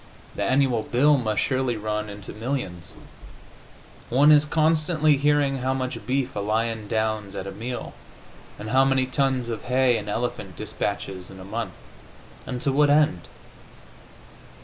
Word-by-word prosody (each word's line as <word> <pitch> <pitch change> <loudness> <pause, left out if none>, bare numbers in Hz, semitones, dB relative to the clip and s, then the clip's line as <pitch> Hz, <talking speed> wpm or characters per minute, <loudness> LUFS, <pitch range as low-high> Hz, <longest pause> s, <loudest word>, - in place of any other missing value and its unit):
The - - -5
annual 130 -4 +2
bill 145 +7 +3
must 110 -4 0
surely 130 -3 0
run 105 0 -3
into 100 0 -9
millions; 105 - -4 1.2
one 140 +5 +5
is 150 0 +6
constantly 155 0 +2
hearing 145 -1 +2
how 130 +1 0
much 130 -4 -4
beef 135 0 -1
a - - -2
lion 110 +1 -1
downs 110 -2 -1
at 95 - -4
a 100 - -5
meal, 120 +4 -6 0.6
and 110 +1 -6
how 130 +1 +5
many 135 -1 +2
tons 130 -2 0
of 115 -2 -5
hay 125 -1 +3
an 105 -1 -6
elephant 120 +4 -3
dispatches 95 -2 -3
in 95 - -11
a 95 - -10
month. 110 -1 -4 0.7
And 125 - -3
to 140 - +2
what 145 +2 +3
end? 145 - +3
125 Hz, 150 wpm, -24 LUFS, 105-135 Hz, 1.2 s, is